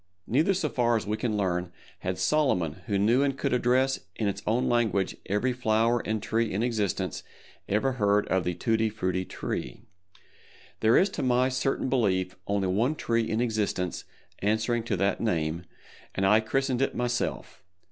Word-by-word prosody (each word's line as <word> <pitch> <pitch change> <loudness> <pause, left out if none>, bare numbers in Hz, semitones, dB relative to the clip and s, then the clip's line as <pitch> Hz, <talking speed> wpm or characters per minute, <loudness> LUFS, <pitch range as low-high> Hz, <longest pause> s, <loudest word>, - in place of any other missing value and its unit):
Neither 155 - +2
so 170 -4 0
far 120 -3 +1
as 110 - -4
we 105 +1 -1
can 110 -1 -1
learn, 90 -3 -1 0.3
had 90 0 -3
Solomon 90 - +1
who 100 -3 +1
knew 115 +7 +3
and 140 -1 0
could 140 -1 -1
address 130 +2 +2 0.2
in 110 - -1
its 100 0 -2
own 115 +4 +2
language 110 -6 +1
every 105 +6 +1
flower 115 0 +2
and 110 -2 -3
tree 115 -1 0
in 105 +4 -1
existence, 110 -6 -1 0.5
ever 110 +7 +2
heard 105 -4 +2
of 95 -1 +2
the 90 0 -2
Tutti 110 +3 +1
Frutti 95 -3 -2
Tree. 65 - -5 1.0
There 110 +2 +4
is 195 - +4
to - - -5
my 125 0 +2
certain 130 +1 -1
belief 95 -8 +1
only 100 -1 0
one 115 +11 +1
tree 115 -5 0
in 110 +2 0
existence 105 -6 -1 0.4
answering 110 +3 +1
to 105 -4 -1
that 100 +2 0
name, 85 -5 -1 0.5
and 95 - +1
I 105 +3 +6
christened 130 +3 0
it 135 - 0
myself. 120 0 -2
110 Hz, 170 wpm, -27 LUFS, 100-125 Hz, 1.0 s, I